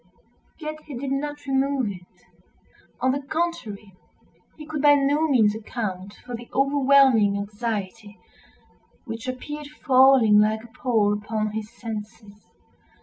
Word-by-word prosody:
Yet 310 -1 -6
he 280 -5 -7
did 270 +2 -4
not 290 +1 -3
remove 270 -4 0
it. 180 -2 -15 0.8
On 260 +1 +3
the 280 +2 -2
contrary, 275 - -4 0.6
he 305 - -9
could 300 -1 -4
by 290 0 +6
no 290 +3 +2
means 225 -8 +3
account 205 -3 -5
for 250 - -8
the 235 +1 -11
overwhelming 270 -6 +4
anxiety 210 0 -5 0.9
which 225 0 -7
appeared 295 +4 -6 0.2
falling 260 -6 +6
like 215 +1 +2
a - - -12
pall 225 -4 +1
upon 215 0 -2
his 215 0 -5
senses. 215 -2 -9
240 Hz, 130 wpm, -24 LUFS, 210-280 Hz, 0.9 s, by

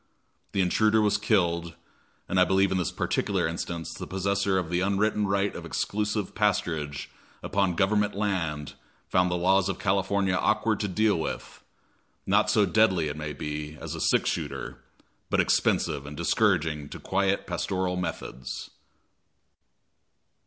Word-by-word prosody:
The 95 - +2
intruder 110 +4 +3
was 105 -1 +2
killed, 85 -6 +1 0.5
and 95 - +1
I - - +7
believe 95 +1 +3
in 95 - +1
this 90 - -1
particular - - 0
instance 85 -1 -4
the - - -7
possessor 95 0 0
of 90 -3 -2
the 90 - +1
unwritten 100 +2 +1
right 100 +1 0
of - - -6
exclusive 105 -1 -2
pasturage 80 -9 0 0.4
upon 95 -3 +1
Government 105 +2 +2
land 85 -8 -2 0.4
found 90 0 +3
the 90 - 0
laws 95 +2 +3
of 95 - -2
California 95 0 +1
awkward 110 +3 +1
to 105 - -1
deal 105 0 +2
with; - - -5 0.6
not - - +3
so 105 - +4
deadly, 95 -8 +3
it 75 - -5
may 75 0 -4
be, 75 +1 -5
as - - -6
a - - -5
six - - +2
shooter, - - -5 0.5
but - - +1
expensive 70 +1 +1
and 75 0 -8
discouraging 80 -5 +1
to - - -8
quiet 100 +1 0
pastoral 90 +1 -1
methods. 85 -8 -5
95 Hz, 145 wpm, -27 LUFS, 85-100 Hz, 0.6 s, I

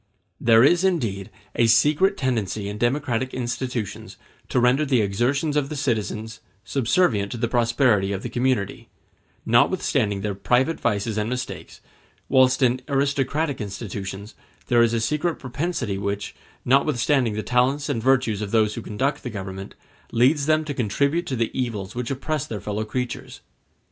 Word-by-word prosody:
There 115 0 +5
is 175 +6 +4
indeed 115 - 0 0.3
a 115 - +3
secret 150 - +4
tendency 110 -6 -1
in 105 +1 -5
democratic 130 0 0
institutions 120 -3 -4 0.3
to - - +2
render 125 +4 +3
the 135 -4 +2
exertions 130 +10 0
of 145 -2 +1
the 155 - -4
citizens 110 -5 -2 0.3
subservient 115 - +1
to - - -5
the 120 +1 0
prosperity 115 -4 +2
of 100 0 -3
the 120 - -4
community, 120 -4 -1 0.6
notwithstanding 120 - +2
their 105 0 -2
private 125 +10 +1
vices 110 -1 -1
and 105 +1 -1
mistakes; 125 0 -6 0.5
whilst 130 0 +4
in 125 +1 +2
aristocratic 140 +1 0
institutions 100 0 -6 0.4
there 120 -1 +5
is 115 0 +3
a - - +1
secret 150 +8 0
propensity 130 - -3
which, 100 0 -3 0.3
notwithstanding 130 -3 +2
the 110 - -3
talents 130 +4 +1
and 135 -6 -1
the - - -10
virtues 125 -6 +2
of 105 - -3
those 110 -1 +2
who 115 - -5
conduct 135 +8 -2
the 125 - -5
government, 95 -2 -7 0.4
leads 140 +5 +3
them 155 0 +2
to 145 - -3
contribute 140 - 0
to 130 - -2
the 115 -2 -1
evils 110 -7 -3
which 120 -1 -4
oppress 140 +2 -2
their 110 - -5
fellow 105 +1 -3
creatures. 125 +3 -5
120 Hz, 160 wpm, -23 LUFS, 110-140 Hz, 0.6 s, There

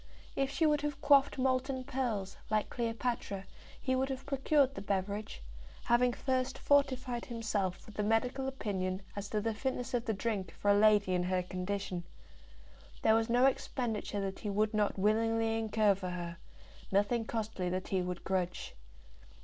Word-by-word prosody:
If 275 0 +1
she 320 +4 +1
would 300 -1 +3
have 295 -1 -3
quaffed 280 -2 +5
molten 260 0 0
pearls, 245 -8 -2
like 215 -1 0
Cleopatra, 230 -4 -2 0.3
he 260 - 0
would 265 +1 0
have 265 0 -4
procured 275 0 +2
the 195 - -6
beverage, 200 - -3 0.4
having 245 +1 +4
first 260 +1 -1
fortified 260 -4 +1
himself 215 -6 -2
with 215 -1 -12
a - - +2
medical 250 +5 +1
opinion 190 -7 -2
as 205 0 -5
to 215 - 0
the 225 +1 0
fitness 255 +2 -3
of 240 -1 0
the 220 - 0
drink 205 -3 -2
for 205 - +2
a - - +7
lady 205 -2 +5
in 180 - +2
her 180 0 0
condition. 185 0 -3 1.0
There 220 - +6
was 225 +1 +2
no 245 +2 +5
expenditure 225 -6 -1
that 195 -1 -3
he 210 - -4
would 210 +2 +1
not 210 -1 +1
willingly 225 +2 +2
incur 215 -2 +3
for 185 -1 -5
her, 175 -1 -5 0.5
nothing 205 +4 +2
costly 215 -5 -2
that 185 +1 -3
he 190 -1 +1
would 180 -1 -4
grudge. 180 -2 -2
220 Hz, 165 wpm, -33 LUFS, 195-255 Hz, 1.0 s, a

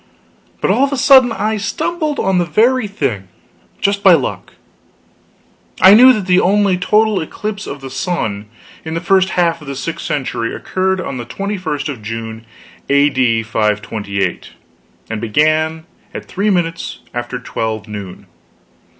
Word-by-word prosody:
But - - +2
all 265 - +3
of 280 - +1
a 280 - -1
sudden 260 -2 +6
I 220 -1 -1
stumbled 305 - -2
on 190 -1 +1
the 175 - +1
very 235 +5 +2
thing, 130 - -3 0.5
just 200 0 0
by 190 -2 +7
luck. 145 -6 -2 1.3
I 190 +1 +8
knew 250 +4 +9
that 215 -6 -1
the 180 0 +4
only 200 0 +3
total 210 +3 +2
eclipse 210 +6 -5
of 140 - -7
the 135 -1 -8
sun 120 - -3 0.4
in 160 0 -5
the - - 0
first 190 +1 +2
half 170 -2 +1
of 150 - -12
the 140 - -5
sixth 160 +5 -5
century 120 -5 -2
occurred 190 0 -1
on 135 -7 -4
the 120 - -6
21st 185 -6 -3
of 135 -7 -6
June, 115 +1 -6 0.4
A.D. 130 -5 +2
528, 105 -2 -1
O.S., - - -16 0.5
and 110 -1 -5
began 155 +7 +1 0.3
at - - -6
3 205 +3 -1
minutes 165 -4 -2
after 120 +1 -4
12 110 -3 -4
noon. 100 -3 -8
160 Hz, 155 wpm, -16 LUFS, -, 1.3 s, knew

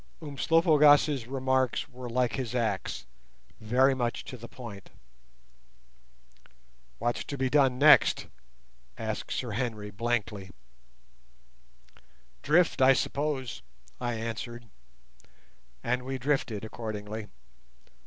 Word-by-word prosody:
Umslopogaas' 150 -3 +4
remarks 130 -1 0
were 125 -3 -9
like 120 -1 +1
his 125 -2 -3
axe—very 110 - -1
much 120 -2 -2
to 130 - -7
the 115 -1 -10
point. 115 -7 -10 2.1
"What's 120 +1 -1
to 140 - -5
be 130 -1 0
done 135 -3 +4
next?" 150 +2 +6 0.7
said - - -3
Sir 125 -3 -3
Henry 110 -2 -3
blankly. 105 -3 -2 1.9
"Drift, 160 0 +3
I 130 +1 +7
suppose," 140 -2 -2 0.4
I 120 -1 -2
answered, 115 +1 -5 1.2
and 125 +1 0
we 130 +1 -4
drifted 125 -5 -1
accordingly. 110 -1 -6
125 Hz, 95 wpm, -29 LUFS, 115-135 Hz, 2.1 s, I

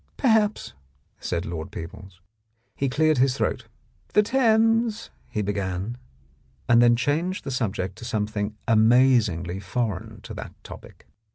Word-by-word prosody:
"Perhaps," 220 -5 +2 0.5
said 85 0 -3
Lord 80 -2 -5
Peebles. 90 +2 -9 0.5
He 135 - -1
cleared 155 +1 +2
his 130 0 +3
throat. - - -2 0.5
"The 210 - +5
Thames," 225 -2 +2 0.2
he 105 - -2
began, 100 +2 -3 0.7
and 120 0 +6
then 120 0 +6
changed 155 +10 -1
the - - -5
subject 100 -7 -2
to - - -8
something 105 -2 -2
amaz 120 +1 +5
ingly 90 +2 -5
foreign 105 +1 -3
to - - -9
that - - -8
topic. - - -12
120 Hz, 130 wpm, -25 LUFS, 100-155 Hz, 0.7 s, and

